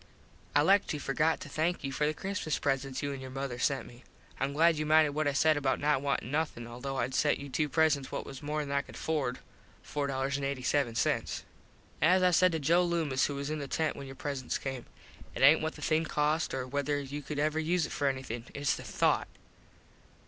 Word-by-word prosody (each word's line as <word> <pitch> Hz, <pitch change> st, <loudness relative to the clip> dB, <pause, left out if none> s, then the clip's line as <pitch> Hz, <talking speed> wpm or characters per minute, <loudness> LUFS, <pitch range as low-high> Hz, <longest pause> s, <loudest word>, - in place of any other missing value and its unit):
I 145 Hz, -, +5 dB
like 195 Hz, +5 st, +4 dB
to 150 Hz, -, -2 dB
forgot 155 Hz, +4 st, +1 dB
to -, -, -7 dB
thank 160 Hz, +4 st, -1 dB
you 135 Hz, -, -2 dB
for 150 Hz, +2 st, 0 dB
the 155 Hz, -, 0 dB
Christmas 190 Hz, -5 st, -2 dB
presents 135 Hz, -1 st, -1 dB
you 145 Hz, 0 st, -1 dB
an 135 Hz, -, -7 dB
your 130 Hz, -, -7 dB
mother 135 Hz, -2 st, -4 dB
sent. 125 Hz, -3 st, -2 dB, 0.4 s
Im 135 Hz, +1 st, 0 dB
glad 160 Hz, +1 st, +4 dB
you -, -, 0 dB
minded 155 Hz, 0 st, +4 dB
what 155 Hz, +1 st, 0 dB
I 145 Hz, -, +1 dB
said 155 Hz, +2 st, +4 dB
about 135 Hz, -2 st, 0 dB
not 145 Hz, -2 st, +2 dB
wantin 140 Hz, -3 st, -1 dB
nothin 150 Hz, -6 st, -1 dB
although 125 Hz, +3 st, -5 dB
Id 130 Hz, -, -1 dB
sent 145 Hz, +3 st, +2 dB
you 140 Hz, -, -8 dB
two 150 Hz, +3 st, 0 dB
presents 150 Hz, -3 st, +2 dB
what -, -, -4 dB
was 135 Hz, -, -9 dB
worth 145 Hz, -, -8 dB
more 150 Hz, 0 st, 0 dB
than 140 Hz, -, -6 dB
I 140 Hz, 0 st, +2 dB
could -, -, -13 dB
afford 140 Hz, -6 st, -1 dB, 0.5 s
($4.87). 140 Hz, -3 st, -1 dB, 0.6 s
As 180 Hz, +5 st, +5 dB
I 180 Hz, -, +5 dB
said 185 Hz, +1 st, +5 dB
to 160 Hz, -, 0 dB
Joe 170 Hz, +5 st, +3 dB
Loomis 160 Hz, -6 st, +1 dB
who 145 Hz, -, -4 dB
was 140 Hz, +1 st, -3 dB
in 155 Hz, -, -2 dB
the 140 Hz, -, -5 dB
tent 160 Hz, +3 st, 0 dB
when 140 Hz, -, -8 dB
your 135 Hz, -, -9 dB
presents 140 Hz, -3 st, -3 dB
came, 135 Hz, -3 st, -5 dB, 0.5 s
it -, -, -1 dB
aint 150 Hz, +4 st, +7 dB
what 160 Hz, +1 st, -2 dB
the -, -, -9 dB
thing 160 Hz, +1 st, +2 dB
cost 150 Hz, 0 st, 0 dB
or 130 Hz, -1 st, -2 dB
wether 145 Hz, +2 st, -1 dB
you 140 Hz, +1 st, -5 dB
could 150 Hz, 0 st, -6 dB
ever 155 Hz, +2 st, +1 dB
use 165 Hz, +1 st, +1 dB
it -, -, -7 dB
for 145 Hz, -, 0 dB
anything. 130 Hz, -4 st, -3 dB
Its 145 Hz, 0 st, +1 dB
the -, -, -8 dB
thought. -, -, +1 dB
145 Hz, 220 wpm, -31 LUFS, 135-155 Hz, 0.6 s, aint